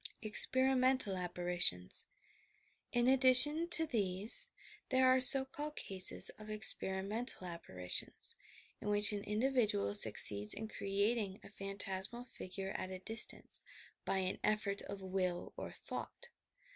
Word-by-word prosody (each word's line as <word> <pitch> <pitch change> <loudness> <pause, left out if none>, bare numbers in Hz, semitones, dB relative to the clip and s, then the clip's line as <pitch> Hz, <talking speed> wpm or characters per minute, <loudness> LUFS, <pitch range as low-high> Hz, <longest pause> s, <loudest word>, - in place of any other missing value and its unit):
EXPERIMENTAL 260 0 +2
APPAHITIONS 175 - -3 0.8
In 240 0 -2
addition 265 +5 +2
to 325 -2 +1
these, 205 -5 +1 0.4
there 260 0 0
are 255 0 +2
so 265 +1 +11
called 295 +3 -10
cases 190 -1 +2
of 215 0 -14
"ex 215 0 +4
perimental 195 +3 -4
apparitions, 90 - -3 0.2
' - - -24
' - - -37
in 210 - -7
which 205 +1 +2
an 200 -1 -7
individual 210 - -3
succeeds 105 -1 +3
in 220 +1 -8
creating 200 0 -4
a - - -16
phantasmal 195 +3 -8
figure 195 -4 -10
at 185 - -8
a 185 - -9
distance, 220 +5 -3 0.4
by - - -4
an 185 0 -5
effort 210 -2 -3
of 200 -1 -11
will 185 -2 -6
or - - -9
thought. 485 - -10
205 Hz, 130 wpm, -32 LUFS, 185-250 Hz, 0.8 s, so